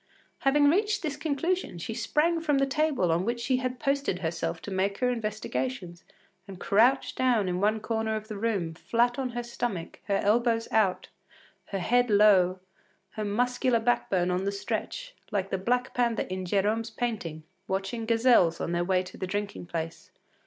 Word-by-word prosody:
” - - -39
Having 290 +1 +5
reached 410 +6 +2
this 300 -3 -2
conclusion, 320 - -1
she 170 +7 -5
sprang 300 +9 +1
from 295 -3 +1
the 275 - +3
table 275 - +1
on 170 +2 +1
which 235 +3 -1
she 255 +2 +1
had 255 0 -3
posted 275 -8 0
herself 165 -1 -3
to 205 - -6
make 195 +1 0
her 250 -1 +1
investigations, 175 - -4 0.4
and 190 -2 -9
crouched 240 +9 +3
down 240 -6 +2
in 180 0 -1
one 215 +2 +2
corner 220 0 -1
of 215 0 -5
the 215 - -6
room, 200 -6 -1
flat 240 +8 0
on 260 -2 -1
her 240 - -1
stomach, 235 -7 -4
her 200 - 0
elbows 230 +2 +2
out, 205 -4 +1 0.6
her 195 - -4
head 245 +6 +2
low, 195 -3 +5 0.5
her 215 - -4
muscular 245 +3 +1
backbone 195 -6 +1
on 180 +1 0
the 200 - 0
stretch, - - -4 0.2
like 195 -3 -2
the 195 - +1
black 245 +5 0
panther 235 -2 +1
in 185 0 -5
Gérome’s 210 +5 0
painting, 180 -10 -3 0.2
watching 195 +4 -3
gazelles 225 -8 +4
on - - -2
their 175 0 +1
way 185 0 +1
to 180 - -11
the 185 - -4
drinking 200 -2 -4
place. 165 -1 -5
220 Hz, 180 wpm, -28 LUFS, 185-250 Hz, 0.6 s, Having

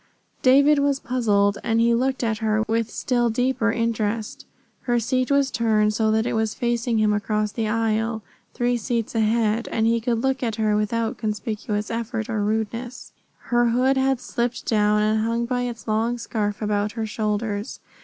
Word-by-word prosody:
David 280 +3 +5
was 280 -1 +1
puzzled, 205 -6 +1
and 225 0 +1
he 235 +1 +4
looked 260 +2 0
at 220 -2 -1
her 215 -1 +1
with 230 0 0
still 240 -2 0
deeper 240 0 +1
interest. 225 -2 -2 0.3
Her 240 -1 +1
seat 255 +3 0
was 280 -1 +2
turned 215 -2 +2
so 220 0 +1
that 220 +1 +2
it - - -1
was 220 -1 0
facing 235 -1 0
him 215 -1 +3
across 210 0 -1
the 225 0 -2
aisle, 225 0 0 0.3
three 245 0 +1
seats 230 -1 -2
ahead, 225 0 +1
and 220 - 0
he 230 0 +2
could 235 -1 0
look 265 0 0
at 230 -4 -1
her 215 -1 +1
without 225 +2 -1
conspicuous 210 -1 -3
effort 230 -1 -3
or 215 -2 -1
rudeness. 225 +4 -3 0.4
Her 240 0 +4
hood 255 +3 +2
had 265 -1 +1
slipped 240 -1 -3
down 210 -1 +2
and 215 +1 +2
hung 230 +1 0
by 245 0 -1
its 230 -1 -9
long 225 +3 0
scarf 210 -2 -3
about 210 0 0
her 225 -1 -3
shoulders. 210 0 -3
225 Hz, 175 wpm, -23 LUFS, 215-240 Hz, 0.4 s, David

